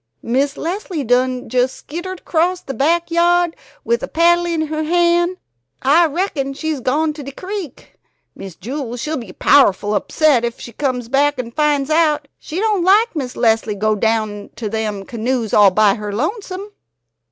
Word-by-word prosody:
"Miss 275 +4 0
Leslie 350 -2 -3
done 250 +1 +1
jes' 255 0 +1
skittered 345 +7 -7
acrost 355 +2 0
de 270 - -4
back 335 +6 +1
yahd 345 0 +3 0.3
wid 470 0 0
a - - -4
paddle 345 -1 +3
in 330 -2 0
her 310 0 -3
han'. 345 +2 +2 0.5
I 320 +6 +5
reckum 290 -4 -2
she's 310 0 -3
gone 300 +5 0
to 300 - -9
de 275 0 -7
crick. 370 - -8 0.3
Miss 195 -3 -9
Jewel, 245 - -5
she'll 305 +6 -3
be 230 -7 -8
powerful 205 -4 +3
upset 285 +1 +2
ef 235 0 -3
she 235 - -9
comes 250 -1 -2
back 285 +3 +2
an' 240 -2 -5
finds 295 +1 +1
out. 305 -2 +2
She 325 - -5
don't 420 -4 +1
like 410 +4 +4
Miss 260 -5 -4
Leslie 225 -2 +2
go 215 +2 +1
down 215 -1 -1
to 220 -3 -4
them 210 -2 -3
canoes 235 -1 -2
all 205 -2 +7
by 205 +1 +4
her 210 0 -5
lonesome." 380 - -4
285 Hz, 170 wpm, -18 LUFS, 235-340 Hz, 0.5 s, all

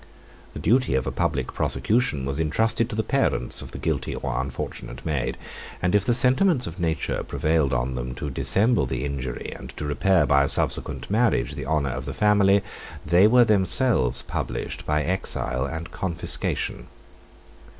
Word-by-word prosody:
The - - -7
duty 125 - +2
of 65 - 0
a - - -2
public - - -1
prosecution 105 - 0
was 70 +2 -2
intrusted 110 +9 +1
to 110 - -4
the 110 - 0
parents 60 - 0
of - - -8
the - - -8
guilty - - -2
or - - -2
unfortunate 65 -1 -6
maid; 75 -6 -2 0.4
and 90 - 0
if 105 -1 +3
the 120 - +3
sentiments 130 +3 +3
of 85 +1 -7
nature 80 -2 -1
prevailed 80 -3 0
on 65 0 -1
them 60 0 -4
to 70 +2 -5
dissemble 110 - +2
the - - -3
injury, 65 -3 -4
and - - -10
to 75 - -4
repair 85 +6 +2
by 70 0 +4
a - - -3
subsequent - - -2
marriage 110 - +2
the 70 -1 -6
honor 70 -2 0
of 70 +2 -5
their 70 - -5
family, 100 -1 +4 0.4
they 85 +6 +5
were 120 +2 +6
themselves 105 - +1
punished - - -4
by 75 0 +1
exile 70 -8 -1
and 80 +2 -6
confiscation. 85 -4 -2
80 Hz, 170 wpm, -24 LUFS, 70-105 Hz, 0.4 s, were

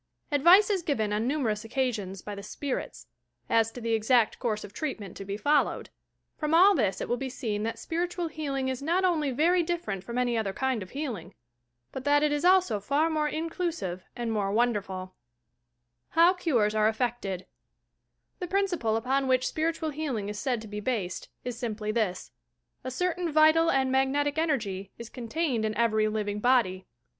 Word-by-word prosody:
Advice 345 +9 +6
is 385 -3 +1
given 220 -10 -1
on 215 +3 0
nmnerons 235 -8 -1
occasions 225 -6 -2
by 210 - -6
the 200 - -7
"spirits," 260 +6 -5 0.5
as 225 -1 +3
to 245 - -8
the 230 -1 -1
exact 225 +1 +2
course 215 -4 -1
of 205 - -10
treatment 220 - -5
to - - -7
be 200 +1 -4
followed. 290 +7 +1 0.5
From 305 +1 +1
all 380 +4 +7
this 215 - 0
it - - -3
will 240 - 0
be 265 +1 -4
seen 220 -5 -3
that 225 +1 -2
spiritual 345 +6 -2
healing 280 -4 -3
is 260 0 -3
not 345 +6 +1
only 315 -6 +1
very 335 +8 +3
different 320 - -3
from 235 +1 -5
any 245 -1 +1
other 210 -4 -1
kind 260 -2 -1
of 185 - -8
healing: 230 - -5 0.6
but 265 - -6
that 290 +1 +3
it 300 - +2
is 295 +1 -1
also 360 - +4
far 285 +10 +1
more 305 -1 +1
inclusive 320 - -3
and 235 -2 -3
more 205 -3 0
wonderful 200 -5 -1 1.0
HOW 340 +2 +6
CUBES 245 - +1
ARE 215 0 +3
EFFECTED 220 -5 -2 0.9
The 360 - -4
principle 350 - 0
upon 265 +4 0
which 255 -1 +2
spiritual 320 0 -1
healing 270 -9 -3
is 210 0 -5
said 245 -4 -1
to - - -9
be 210 0 -5
based 210 -5 -3
is 245 -2 -5
simply 215 -3 -3
this: 215 -5 -2 0.5
A - - -4
certain 355 +4 -1
vital 315 +2 +5
and 265 -1 +2
mag 265 0 +3
netic 290 +2 0
energy 210 - -1
is 235 -1 -8
contained 250 0 -2
in 215 -1 -1
every 220 -2 +2
living 210 -1 -2
body. 210 -6 +2
250 Hz, 180 wpm, -28 LUFS, 215-310 Hz, 1.0 s, all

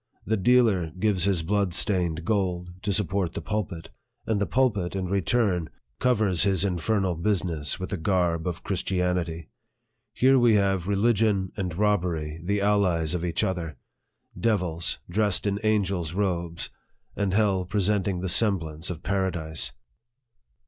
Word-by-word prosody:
The 110 - +1
dealer 110 -5 +3
gives 100 -3 +2
his 95 -5 +2
blood 100 0 0
stained 85 -5 0
gold 90 -5 -1
to 105 - -1
support 95 -2 0
the - - -2
pulpit, 100 -6 -4 0.3
and 110 -2 0
the 100 - +1
pul 130 -1 +3
pit, 95 -3 -4
in 95 -1 -2
return, 95 -1 0 0.3
covers 105 -8 +2
his 95 -1 +3
infernal 95 +1 0
business 85 -4 -1
with 95 - -5
the 95 - -1
garb 85 -1 0
of 90 0 -4
Christianity. 90 -4 -1 0.6
Here 130 +1 +4
we 120 -3 +5
have 95 -3 +1
religion 100 -2 +2
and 90 -4 -4
robbery 85 -7 0
the 100 +3 0
allies 90 -6 +2
of 90 -1 -2
each 85 -2 -1
other 85 -5 -3 0.6
devils 90 -7 0
dressed 105 +2 +1
in 100 0 0
angels' 95 -6 0
robes, 85 -4 -2 0.4
and 100 -2 -1
hell 100 -3 +2
presenting 100 -1 0
the 95 - -2
semblance 85 -5 +2
of 85 -2 -6
paradise. 85 -8 -1
95 Hz, 140 wpm, -26 LUFS, 85-105 Hz, 0.6 s, we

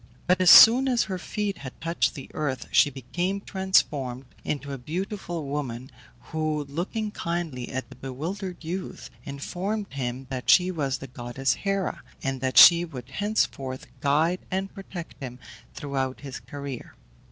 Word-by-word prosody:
But 180 +1 +3
as 180 - +6
soon 250 +4 +10
as 245 -2 +3
her 190 -2 -4
feet 205 +1 -3
had 130 -2 -9
touched 165 +1 0
the 135 - -8
earth 145 -4 -2
she - - +5
became 175 - -3
transformed 150 -10 0 0.2
into 140 -1 -3
a 135 - -5
beautiful 175 - -4
woman, 135 -3 -4 0.4
who, 155 -1 0
looking 180 +9 -3
kindly 170 -10 -3
at 130 0 -4
the - - -12
bewildered 170 +8 -5
youth, 180 +4 -5
informed 180 +8 -4
him 130 -1 -3
that 130 -1 -4
she 185 0 +6
was 140 -6 -1
the 135 - -8
goddess 120 +1 -1
Hera, 195 - -2 0.2
and 135 -1 -2
that 130 -1 -1
she 170 0 +10
would 135 -7 -8
henceforth 140 -10 -1
guide 155 +6 +2
and 190 +1 -2
protect 190 -6 -9
him 125 -2 -6 0.4
throughout 135 -2 -3
his 135 -3 -7
career. 135 +1 -8
150 Hz, 150 wpm, -26 LUFS, 135-185 Hz, 0.4 s, soon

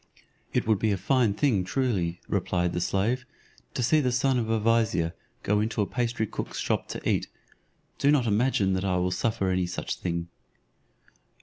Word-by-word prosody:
"It - - 0
would 110 -3 +2
be 110 0 +1
a 100 - +1
fine 120 -1 +2
thing 110 -6 +2
truly," 95 -5 -1
replied 90 -1 0
the 85 - -1
slave, 110 +9 0 0.5
"to 125 - 0
see 155 +6 +4
the 125 -3 +1
son 130 +1 +2
of 110 -2 -2
a 115 0 +2
vizier 110 -7 +2 0.3
go 105 +1 +2
into 110 +1 -1
a 105 - +3
pastry 120 0 -1
cook's - - -5
shop - - -1
to - - -5
eat; - - +1 0.7
do 140 - +3
not 145 -4 +4
imagine 105 -3 +2
that 95 0 -1
I 95 -2 +1
will 90 0 +1
suffer 95 -1 0
any 90 -1 +1
such 90 - -3
thing." 85 -1 -3
105 Hz, 185 wpm, -27 LUFS, 90-120 Hz, 0.7 s, see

